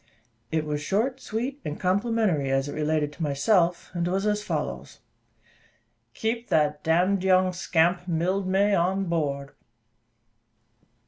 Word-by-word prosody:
It 160 Hz, -1 st, 0 dB
was 150 Hz, -1 st, -2 dB
short, 225 Hz, -, 0 dB
sweet, 255 Hz, +6 st, -4 dB
and 150 Hz, -, -5 dB
complimentary, 190 Hz, -, +1 dB
as 135 Hz, +1 st, +1 dB
it 145 Hz, -, -5 dB
related 150 Hz, -1 st, 0 dB
to 170 Hz, -, -12 dB
myself, 170 Hz, +4 st, +1 dB
and 175 Hz, -1 st, -1 dB
was 190 Hz, +3 st, -1 dB
as 210 Hz, 0 st, +1 dB
follows: -, -, -4 dB, 1.2 s
"Keep 230 Hz, +1 st, -2 dB
that 150 Hz, -1 st, +1 dB
d 160 Hz, -, -5 dB, 0.3 s
d 190 Hz, -, -2 dB
young 185 Hz, 0 st, +4 dB
scamp, 175 Hz, 0 st, +1 dB
Mildmay, 190 Hz, +4 st, +1 dB
on 190 Hz, +2 st, +1 dB
board." 145 Hz, -5 st, -2 dB
180 Hz, 130 wpm, -26 LUFS, 155-200 Hz, 1.2 s, young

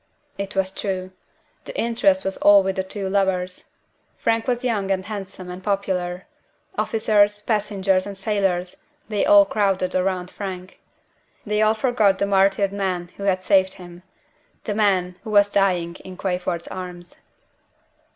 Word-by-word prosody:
It 200 Hz, 0 st, -4 dB
was 190 Hz, -1 st, +1 dB
true! 185 Hz, -2 st, -4 dB, 0.5 s
The -, -, -6 dB
interest 245 Hz, +5 st, +2 dB
was 195 Hz, -, -1 dB
all 205 Hz, -1 st, +6 dB
with 190 Hz, 0 st, -1 dB
the 190 Hz, -, 0 dB
two 195 Hz, +1 st, -5 dB
lovers. 190 Hz, -2 st, -1 dB, 0.5 s
Frank 225 Hz, +1 st, 0 dB
was 245 Hz, 0 st, 0 dB
young 210 Hz, -6 st, 0 dB
and 190 Hz, -1 st, 0 dB
handsome 195 Hz, -3 st, -7 dB
and 180 Hz, +1 st, -9 dB
popular. 190 Hz, -3 st, -2 dB, 0.5 s
Officers, 210 Hz, -2 st, +2 dB
passengers, 200 Hz, -3 st, 0 dB
and 200 Hz, -1 st, -7 dB
sailors, 190 Hz, -3 st, -1 dB, 0.3 s
they 210 Hz, -2 st, 0 dB
all 200 Hz, -1 st, +8 dB
crowded 195 Hz, -2 st, 0 dB
round 185 Hz, -1 st, -1 dB
Frank. 185 Hz, -2 st, -7 dB, 0.7 s
They 210 Hz, 0 st, 0 dB
all 215 Hz, +1 st, +4 dB
forgot 220 Hz, -4 st, +2 dB
the 200 Hz, -, +1 dB
martyred 195 Hz, 0 st, +2 dB
man 185 Hz, -3 st, -2 dB
who 200 Hz, -, -5 dB
had 185 Hz, -2 st, +1 dB
saved 190 Hz, -1 st, +3 dB
him 175 Hz, -1 st, -12 dB, 0.6 s
the 210 Hz, -, -2 dB
man 190 Hz, -4 st, +1 dB
who -, -, -7 dB
was 205 Hz, -1 st, +4 dB
dying 180 Hz, -4 st, +1 dB
in 185 Hz, -1 st, -10 dB
Crayford's 180 Hz, -2 st, -2 dB
arms. 180 Hz, -1 st, -7 dB
195 Hz, 150 wpm, -22 LUFS, 185-205 Hz, 0.7 s, all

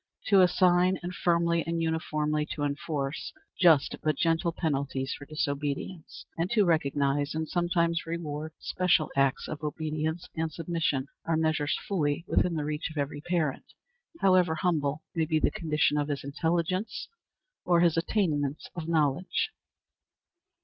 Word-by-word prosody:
To 200 Hz, -2 st, +7 dB
assign, 180 Hz, 0 st, +4 dB
and 180 Hz, +1 st, -4 dB
firmly 170 Hz, -1 st, +2 dB
and 165 Hz, 0 st, -1 dB
uniformly 155 Hz, -2 st, -1 dB
to 145 Hz, -, -3 dB
enforce, 145 Hz, -1 st, -3 dB, 0.3 s
just 160 Hz, -6 st, +5 dB
but 155 Hz, -2 st, 0 dB
gentle 165 Hz, +1 st, +1 dB
penalties 140 Hz, -5 st, -2 dB
for 145 Hz, -, -9 dB
disobedience, 150 Hz, +2 st, -3 dB
and 170 Hz, +2 st, 0 dB
to 210 Hz, -4 st, +4 dB
recognize, 145 Hz, -3 st, +1 dB
and 160 Hz, 0 st, -2 dB
sometimes 170 Hz, -1 st, 0 dB
reward, 155 Hz, -2 st, -4 dB
special 180 Hz, -4 st, +1 dB
acts 135 Hz, -1 st, +2 dB
of 155 Hz, 0 st, -6 dB
obedience 155 Hz, +2 st, -3 dB
and 160 Hz, -1 st, -1 dB
submission, 160 Hz, -4 st, -1 dB, 0.2 s
are 165 Hz, -1 st, +1 dB
measures 155 Hz, -2 st, +1 dB
fully 160 Hz, -4 st, 0 dB
within 175 Hz, -2 st, +2 dB
the 150 Hz, -2 st, -2 dB
reach 150 Hz, +1 st, -2 dB
of 160 Hz, -, -10 dB
every 145 Hz, 0 st, -2 dB
parent, 160 Hz, -4 st, -2 dB, 0.5 s
however 185 Hz, -4 st, +4 dB
humble 155 Hz, -3 st, 0 dB
may 165 Hz, -2 st, +1 dB
be 160 Hz, 0 st, +1 dB
the -, -, +2 dB
condition 150 Hz, -2 st, +1 dB
of 145 Hz, -, -1 dB
his 145 Hz, -2 st, -3 dB
intelligence 170 Hz, +7 st, -1 dB, 0.6 s
or 175 Hz, -1 st, +3 dB
his 170 Hz, -2 st, +4 dB
attainments 155 Hz, -6 st, 0 dB
of 165 Hz, -2 st, -5 dB
knowledge. 165 Hz, -, +1 dB
160 Hz, 140 wpm, -28 LUFS, 145-170 Hz, 0.6 s, To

